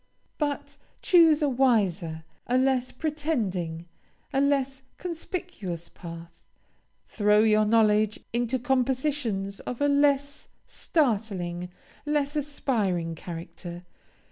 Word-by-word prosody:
But, 290 -2 -2 0.3
choose 330 -4 +6
a - - +4
wiser, 200 - +1 0.2
a 250 - +2
less 260 -1 +2
pretending, 225 - -2 0.5
a 270 - +3
less 275 -1 +1 0.2
conspicuous 335 - -5
path. 170 -1 -10 0.6
Throw 210 0 +3
your 215 -1 +4
knowledge 215 -1 +3
into 240 +2 +1
compositions 255 -5 0
of 245 - -6
a 285 - +3
less 285 0 +2 0.2
startling, 195 - -1 0.4
less 295 0 0
aspiring 220 - -1
character. 170 +1 -8
240 Hz, 95 wpm, -27 LUFS, 190-285 Hz, 0.6 s, choose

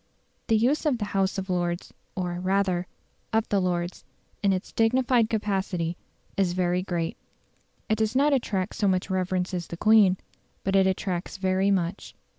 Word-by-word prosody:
The 225 - +4
use 270 +8 +2
of 270 -5 +2
the 210 - -2
House 195 0 +1
of 190 0 -3
Lords 175 -1 -2 0.2
or, 180 -2 -2
rather, 185 -1 +1 0.4
of 220 0 +1
the 200 -2 +2
Lords, 175 -1 -2 0.4
in 200 - +3
its 185 0 -2
dignified 240 0 +3
capacity 190 -5 -1 0.4
is 190 -3 +1
very 180 0 +1
great. 175 -3 -2 0.7
It 215 0 +1
does 220 +2 0
not 285 +2 +4
attract 205 -7 0
so 210 - 0
much 185 0 0
reverence 185 0 -1
as 175 -2 -3
the 170 - -7
Queen, 210 -2 +5 0.5
but 195 0 0
it 190 -1 +5
attracts 185 -1 -2
very 190 +1 +1
much. 185 -1 -1
190 Hz, 165 wpm, -26 LUFS, 180-215 Hz, 0.7 s, Queen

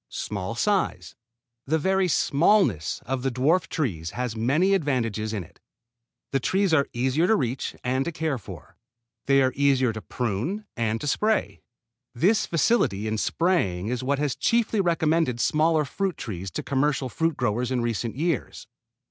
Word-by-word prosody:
Small 100 +1 -4
size. 120 - 0 0.5
The 160 +3 +2
very 190 +4 +1
smallness 145 - +2
of 130 +1 -2
the 135 - 0
dwarf 150 +8 +1
trees 90 - -2
has 125 -2 -2
many 145 - +2
advantages 115 - 0
in 105 -4 -3
it. - - -19 0.7
The 135 - +1
trees 190 +6 +1
are 140 -3 +3
easier 130 +7 +1
to 220 - +4
reach 130 - -2
and 130 +2 0
to 170 - -2
care 155 -4 -2
for. 100 - -12 0.5
They 135 -1 +5
are 130 - +1
easier 135 -4 +2
to 110 - -6
prune 125 - -3
and 115 -1 -1
to - - -4
spray. 215 +9 0 0.5
This 200 - +2
facility 150 - +1
in 110 0 -1
spraying 110 - 0
is 125 +1 -2
what 140 +2 0
has 145 -1 -1
chiefly 230 -3 +1
recommended 165 -7 +1
smaller 155 +3 +2
fruit 190 +5 -2
trees 95 -6 -5
to - - -5
commercial 140 0 0
fruit 165 +4 -1
growers 120 0 0
in 130 -2 0
recent 115 -1 -2
years. 160 0 -2
135 Hz, 160 wpm, -25 LUFS, 115-165 Hz, 0.7 s, They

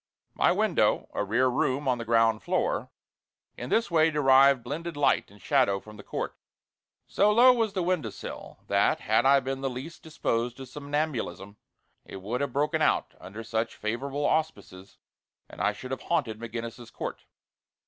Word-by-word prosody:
My - - +3
window - - +1
a - - -1
rear 120 +6 +2
room 130 +2 0
on 125 -2 +1
the 115 - -5
ground 115 -1 +3
floor - - -1 0.7
in 125 - -7
this 225 -5 +1
way 160 -1 +4
derived 135 -3 +5
blended 155 +5 -5
light 145 - +2
and 100 +1 -18
shadow 125 -9 +2
from 105 +2 -13
the 105 - -10
court. - - -4 0.7
So 205 +1 +2
low 245 +4 +7
was 225 -4 0
the 185 - -1
window 180 -3 0
sill, - - -9
that - - +2
had 130 - +2
I 140 0 +6
been 135 +1 -4
the 135 - -1
least 130 +7 -8
disposed 120 -6 -2
to 135 - -8
somnambulism 145 -8 -4 0.5
it 95 - -9
would 110 +7 -3
have 140 -2 -1
broken 145 +4 0
out - - +1
under 100 +5 -9
such 115 0 -2
favorable 135 +7 -3
auspices, 125 -14 -2 0.5
and - - -9
I - - +3
should 125 +5 -9
have 130 - -3
haunted 135 -11 -1
McGinnis's 115 +1 -7
Court. - - -6
130 Hz, 170 wpm, -27 LUFS, 115-150 Hz, 0.7 s, low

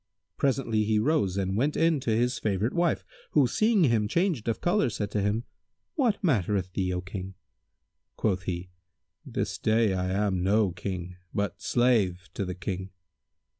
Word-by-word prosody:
Presently 125 -6 +1
he 110 0 +1
rose 105 - +1
and 95 0 -1
went 140 +7 +1
in 165 -2 +3
to 125 - -3
his 120 +3 +1
favourite 105 +3 0
wife 175 -2 +1 0.3
who, 145 -3 +5
seeing 215 - +3
him 115 -7 +3
changed 170 - 0
of 115 - 0
colour, 175 -6 +2
said 105 -2 -3
to 105 - 0
him, 105 +3 0 0.5
"What 235 -8 +1
mattereth 100 - +1
thee, 95 -1 0
O 90 0 -2
King?" 95 0 -7 0.8
Quoth 95 -4 0
he, 90 0 -4 0.5
"This - - -3
day 110 -2 +3
I 90 0 -1
am 95 -1 0
no 100 +1 +3
King 90 0 -5 0.2
but 100 -1 -2
slave 100 -8 +2
to 100 - -2
the 90 0 -4
King." 95 +1 -4
105 Hz, 165 wpm, -28 LUFS, 95-125 Hz, 0.8 s, who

